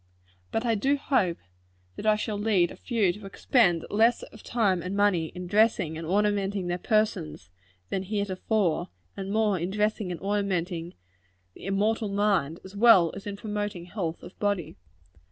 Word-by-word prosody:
But 225 Hz, +2 st, -1 dB
I 230 Hz, -, +2 dB
do 270 Hz, +7 st, +1 dB
hope 205 Hz, -12 st, +1 dB, 0.6 s
that 215 Hz, -, -5 dB
I 215 Hz, -, +5 dB
shall 210 Hz, 0 st, -3 dB
lead 200 Hz, -5 st, +2 dB
a -, -, -9 dB
few 215 Hz, -8 st, 0 dB
to 205 Hz, 0 st, -10 dB
expend 195 Hz, -, +2 dB
less 225 Hz, +3 st, +3 dB
of 220 Hz, -, -12 dB
time 200 Hz, -7 st, +1 dB
and 185 Hz, +3 st, -4 dB
money 195 Hz, -6 st, +2 dB
in 180 Hz, 0 st, -6 dB
dressing 200 Hz, -5 st, +2 dB
and 160 Hz, 0 st, -6 dB
ornamenting 200 Hz, 0 st, +1 dB
their 175 Hz, 0 st, -2 dB
persons 185 Hz, -, -1 dB, 0.4 s
than 190 Hz, -, 0 dB
heretofore, 200 Hz, -2 st, -1 dB, 0.3 s
and 195 Hz, 0 st, -5 dB
more 210 Hz, -3 st, +2 dB
in 175 Hz, +2 st, -2 dB
dressing 210 Hz, -1 st, -1 dB
and 170 Hz, -, -5 dB
ornamenting 185 Hz, -4 st, -2 dB, 0.6 s
the -, -, -12 dB
immortal 210 Hz, +2 st, +1 dB
mind, 200 Hz, -6 st, +1 dB
as 190 Hz, +1 st, -11 dB
well 200 Hz, -7 st, +6 dB
as 195 Hz, +1 st, -8 dB
more -, -, -1 dB
in 200 Hz, -, -6 dB
promoting 205 Hz, -4 st, -4 dB
health 175 Hz, -3 st, -4 dB
of -, -, -11 dB
body. 200 Hz, -5 st, -1 dB
200 Hz, 170 wpm, -27 LUFS, 180-215 Hz, 0.6 s, well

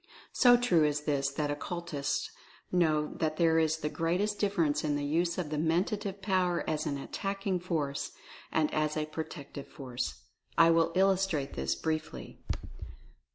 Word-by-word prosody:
So 245 Hz, -1 st, +7 dB
true 185 Hz, -10 st, +3 dB
is 150 Hz, 0 st, +1 dB
this 140 Hz, -2 st, 0 dB
that 145 Hz, 0 st, -1 dB
occultists 155 Hz, -1 st, -3 dB, 0.4 s
know 155 Hz, -4 st, +2 dB
that 155 Hz, -1 st, 0 dB
there 165 Hz, -1 st, +4 dB
is 160 Hz, 0 st, +2 dB
the 150 Hz, -, -3 dB
greatest 180 Hz, +7 st, 0 dB
difference 170 Hz, -8 st, +1 dB
in 150 Hz, -1 st, +1 dB
the 145 Hz, 0 st, -1 dB
use 170 Hz, +3 st, +1 dB
of 165 Hz, -5 st, -3 dB
the 150 Hz, -, -1 dB
Mentative 195 Hz, +5 st, 0 dB
Power 185 Hz, -3 st, +1 dB
as 155 Hz, -1 st, -1 dB
an 140 Hz, -, -1 dB
Attacking 195 Hz, +5 st, -2 dB
Force, 155 Hz, -6 st, -2 dB, 0.4 s
and 155 Hz, -1 st, +1 dB
as 155 Hz, 0 st, 0 dB
a 155 Hz, -, 0 dB
Protective 155 Hz, -2 st, -7 dB
Force. 125 Hz, -3 st, -5 dB, 0.3 s
I 165 Hz, +1 st, +7 dB
will 165 Hz, 0 st, +3 dB
illustrate 190 Hz, -6 st, +2 dB
this 65 Hz, 0 st, -1 dB
briefly. 155 Hz, -, -4 dB
160 Hz, 155 wpm, -31 LUFS, 150-180 Hz, 0.4 s, So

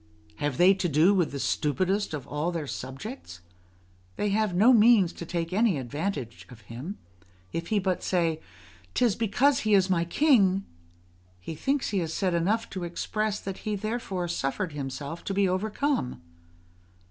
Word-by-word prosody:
Have 145 Hz, -3 st, -2 dB
they 185 Hz, +2 st, +6 dB
to 190 Hz, -2 st, -1 dB
do 160 Hz, +7 st, +4 dB
with 180 Hz, -5 st, +1 dB
the 140 Hz, -, -4 dB
stupidest 185 Hz, +7 st, 0 dB
of 140 Hz, -, -7 dB
all 150 Hz, +4 st, -2 dB
their 165 Hz, -3 st, -3 dB
subjects? 135 Hz, -, -7 dB, 0.7 s
they 210 Hz, -, -1 dB
have 210 Hz, -2 st, +1 dB
no 225 Hz, +8 st, +6 dB
means 215 Hz, -5 st, +5 dB
to 170 Hz, -, -8 dB
take 170 Hz, 0 st, -3 dB
any 210 Hz, -4 st, +3 dB
advantage 135 Hz, -, -4 dB
of 120 Hz, -3 st, -13 dB
him; 125 Hz, -, -7 dB, 0.6 s
if 165 Hz, 0 st, -3 dB
he 215 Hz, -, +1 dB
but 185 Hz, -2 st, 0 dB
say: 165 Hz, -3 st, 0 dB, 0.5 s
"'Tis 240 Hz, -5 st, +3 dB
because 245 Hz, +6 st, +2 dB
he 215 Hz, -1 st, +3 dB
is 190 Hz, -1 st, +3 dB
my 170 Hz, -2 st, +2 dB
king," 195 Hz, -, +3 dB, 0.7 s
he 90 Hz, -, -6 dB
thinks 270 Hz, -, -1 dB
he 200 Hz, -, +1 dB
has 165 Hz, -2 st, -2 dB
said 185 Hz, -3 st, 0 dB
enough 190 Hz, +7 st, +1 dB
to 185 Hz, -2 st, -4 dB
express 210 Hz, +4 st, -2 dB
that 195 Hz, -1 st, -6 dB
he 215 Hz, -1 st, -2 dB
therefore 205 Hz, -4 st, -3 dB
suffered 170 Hz, +3 st, -2 dB
himself 140 Hz, +3 st, -5 dB
to 195 Hz, -, -3 dB
be 200 Hz, 0 st, +3 dB
overcome. 210 Hz, -, -1 dB
185 Hz, 165 wpm, -27 LUFS, 160-210 Hz, 0.7 s, they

